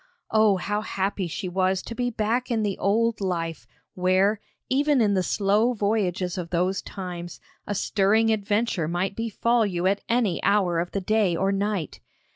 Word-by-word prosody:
Oh, 215 -3 +4
how 205 +3 -2
happy 195 -2 -2
she 185 +4 -4
was 185 +1 0
to - - -6
be 245 +1 -1
back 235 +3 -1
in 225 -3 0
the 200 -2 -1
old 220 +2 +1
life, 165 -7 -3 0.3
where, 185 +3 +2 0.3
even 285 +1 +2
in 210 -3 +3
the 190 - +2
slow 210 +6 +2
voyages 195 -4 -1
of 170 -2 -5
those 180 +3 0
times, 175 -3 -7 0.3
a 205 - -2
stirring 215 +3 +2
adventure 205 -4 0
might 180 +4 -2
befall 230 +1 +1
you 180 -4 -1
at 195 +2 +2
any 230 -6 +1
hour 185 -5 +2
of 175 +1 -2
the 200 - -1
day 205 -2 +2
or 195 +3 +1
night! 200 -4 -2
200 Hz, 170 wpm, -25 LUFS, 185-220 Hz, 0.3 s, Oh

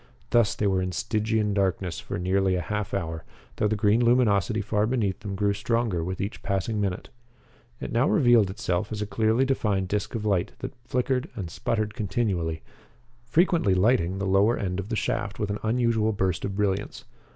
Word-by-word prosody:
Thus 115 -3 +3
they 105 - -1
were 95 -2 +2
in 90 0 -2
Stygian 110 0 0
darkness 95 -3 -1
for - - -5
nearly 95 +1 +1
a - - 0
half 105 +1 -3
hour, 80 -5 -3 0.3
though 105 - +2
the 110 - 0
green 105 +3 +3
luminosity 115 -3 +3
far 105 +1 0
beneath 110 -7 0
them 100 -2 -5
grew 100 +1 +1
stronger 110 -4 0
with 95 +2 -4
each 100 +2 -4
passing 100 +2 -1
minute. 95 -3 -3 0.7
It - - -5
now 120 +5 +2
revealed 120 -7 +4
itself 100 -1 -2
as 105 -1 -2
a - - -3
clearly 110 +5 +2
defined 105 -8 0
disc 105 +3 -2
of 110 -2 -3
light 95 -4 0
that 130 - -6
flickered 130 +2 -1
and 90 -6 -5
sputtered 110 +3 -2
continually, 95 -8 -1 0.6
frequently 160 - +3
lighting 95 -2 +2
the 100 - -2
lower 100 +5 +3
end 90 -1 -2
of 100 +2 -5
the 115 - -1
shaft 100 -2 -2
with 105 -1 -2
an 105 - -3
unusual 110 -1 +1
burst 95 -3 -1
of 100 - -4
brilliance. 100 -1 -2
105 Hz, 185 wpm, -26 LUFS, 95-115 Hz, 0.7 s, revealed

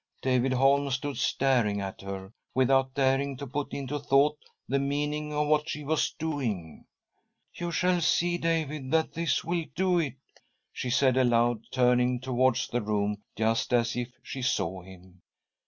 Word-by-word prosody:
David 130 0 +2
Holm 140 +2 +3
stood 135 0 -2
staring 120 -8 +1
at 95 -1 -5
her, 95 +1 -7 0.2
without 130 0 +3
daring. 135 0 +1
.to 140 - -6
put 140 +2 -4
into 140 +1 -3
thought 140 +2 +3 0.3
the 140 +1 +1
meaning 150 +2 -2
of 150 0 0
what 150 +1 +1
she 150 - -4
was. 155 +2 +1
doing. 125 - -3 0.7
"You 175 - -4
shall 180 +1 +1
see, 175 +2 +2
David, 155 -5 -1
that 160 +2 +1
this 170 0 0
will 170 -1 -1
do 180 -1 +2
it!" 145 -5 -2 0.6
she 125 - -4
said 130 0 +3
aloud, 120 -2 +2
turning 125 -1 +3
towards 130 0 +1
the 120 - -1
room 105 -1 -1
just 110 +2 0
as 120 -1 +2
if 120 0 -3
she 135 - -6
saw 95 -6 -1
him. 95 0 -15
130 Hz, 155 wpm, -28 LUFS, 120-150 Hz, 0.7 s, Holm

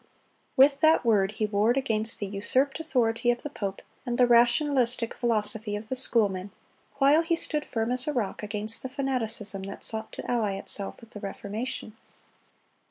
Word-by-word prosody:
With 275 +1 +6
that 315 -5 +4
Word 205 -3 +3
he 215 - -1
warred 215 +4 +2
against 225 -4 -1
the 205 - -3
usurped 255 +9 0
authority 240 -6 +1
of 240 0 0
the 295 - -5
pope, 200 -7 -5 0.2
and 240 -2 -2
the 250 - +6
rationalistic 240 0 +3
philosophy 220 -2 -1
of 215 +1 -7
the 260 - -1
schoolmen, 205 -7 +1 0.5
while 280 +3 +5
he 335 0 +1
stood 300 -2 -1
firm 225 0 -2
as 250 +2 0
a - - +1
rock 235 -8 -2
against 210 +1 -3
the 260 - -5
fanaticism 230 -7 -2
that 195 +1 -8
sought 220 0 -3
to - - -6
ally 225 -5 0
itself 195 0 -3
with 230 0 -15
the 210 - -8
Reformation. 210 +3 -5
230 Hz, 170 wpm, -27 LUFS, 210-260 Hz, 0.5 s, With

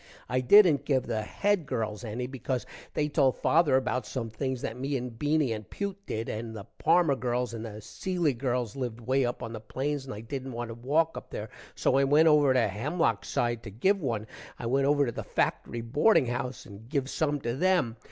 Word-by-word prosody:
i 130 +1 0
dident 155 -1 +6
give 135 -3 +1
the 110 -1 -1
Head 195 - 0
girls 110 -2 -3
any 120 +2 -3
because 130 -1 -3 0.3
they 150 - +1
told 140 -3 +2
father 155 -4 +3
about 130 -1 +1
some 115 -2 -4
things 130 +3 -2
that 110 - -3
me 135 +2 -2
and 120 -2 -6
Beany 150 -4 +2
and 105 -2 -7
Pewt 200 -1 -3
did 110 +1 -3
and 110 +1 -5
the 105 - -6 0.2
Parmer 170 -6 +4
girls 125 0 -1
and 115 -1 -5
the 105 -2 -7
Cilley 175 - -1
girls 125 -3 -1
lived 120 -4 -4
way 130 +3 +1
up 120 - -4
on 115 - -5
the 110 - -5
plains 135 +5 -3
and 130 - -6
i 105 - -7
dident 135 +1 -5
want 120 0 -4
to - - -5
walk 150 +8 +1
up - - -21
there, - - -6 0.2
so - - +2
when 135 - +4
i - - +3
went 150 +4 +5
over 150 -3 +5
to 125 -3 +3
Hemlock 115 - 0
side 120 -1 -1
to 110 - -8
give 190 - +1
one, 115 -7 -2 0.3
i - - -6
went 135 +3 +2
over 145 0 +4
to 120 - -2
the - - -5
factory 120 - -1
boarding 145 - +3
house 125 +1 -4
and 105 +2 -12
give 140 -2 0
some 145 0 0
to 120 0 -2
them. 175 -7 +2
130 Hz, 220 wpm, -28 LUFS, 115-145 Hz, 0.3 s, dident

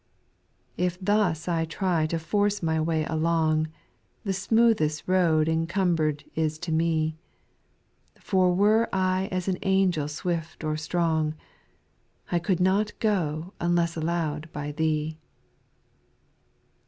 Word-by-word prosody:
3. - - 0
If 180 0 -2
thus 185 -5 +1
I 165 -2 +1
try 165 0 0
to 165 - -1
force 205 +4 0
my 160 -1 +1
way 160 -1 0
along. 160 -1 +1 0.6
The 195 -3 -1
smoothest 200 -6 +2
road 170 -4 +3
encumber'd 165 -2 0
is 155 -1 -1
to 170 +1 -5
me; 160 -1 0 1.0
For 185 -2 +2
were 210 +5 +3
I 185 0 0
as 185 0 -2
an 185 -1 0
angel 190 -6 +2
swift 165 +1 -4
or 155 0 -1
strong, 160 -1 0 1.0
I 175 - +2
could 180 0 0
not 195 +3 +1
go 175 -5 -1
unless 170 -1 +1
allow'd 160 -1 -2
by 145 0 -4
Thee. 155 0 -1
165 Hz, 120 wpm, -26 LUFS, 155-185 Hz, 1.0 s, road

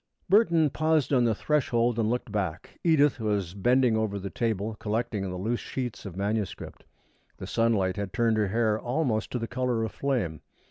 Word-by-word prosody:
Burton 170 -7 +4
paused 155 -3 +1
on 125 -2 +4
the 115 -2 +2
threshold 120 -4 +1
and 110 -1 +1
looked 120 -2 -2
back. 95 -5 -4
Edith 150 -5 +4
was 100 -5 -1
bending 120 +4 +3
over 110 -2 -1
the 100 0 -5
table, 110 -2 -1
collecting 110 -1 -2
the 90 - -5
loose 115 +6 -1
sheets 125 -6 -5
of 90 - -8
manuscript. 105 +1 -3 0.5
The - - -7
sunlight 105 -5 +1
had 100 -2 -3
turned 115 0 +1
her 105 -2 +2
hair 110 +1 +1
almost 120 -3 -1
to - - 0
the 115 - -3
color 125 -2 -1
of 110 - -3
flame. 115 - -2
115 Hz, 180 wpm, -27 LUFS, 105-125 Hz, 0.5 s, Burton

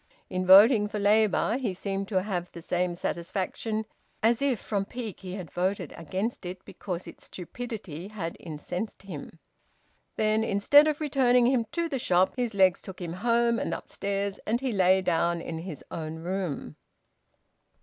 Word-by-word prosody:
In 185 0 -1
voting 210 +3 +8
for 210 - -4
Labour, 215 +3 +3
he 220 -8 -2
seemed 195 +1 -3
to 190 -3 +1
have 180 -4 -3
the 170 - -9
same 180 0 0
satisfaction 190 +6 -3 0.4
as 230 +2 +3
if 270 -6 +1
from 200 -2 -1
pique 225 -1 -6
he 185 -1 -6
had 180 -6 -7
voted 185 +3 -1
against 190 +9 -3
it 180 +1 -7
because 180 -2 -6
its - - -11
stupidity 195 -3 -7
had 190 -6 -5
incensed 180 +7 -6
him. 165 -4 -8 0.8
Then, 215 0 +2
instead 225 +9 +5
of 305 0 -1
returning 255 -4 +3
him 245 -2 +3
to 340 0 0
the 275 -5 -2
shop, 185 -4 +3
his 240 -4 -2
legs 190 -2 +4
took 190 - -9
him 170 -2 -4
home 235 +3 +2
and - - -1
upstairs, 200 0 -3
and 230 +3 +1
he 265 -1 -1
lay 190 -2 +4
down 170 -1 +1
in 165 -1 -5
his 165 -3 -7
own 160 -1 -4
room. 170 - -4
195 Hz, 165 wpm, -28 LUFS, 180-225 Hz, 0.8 s, voting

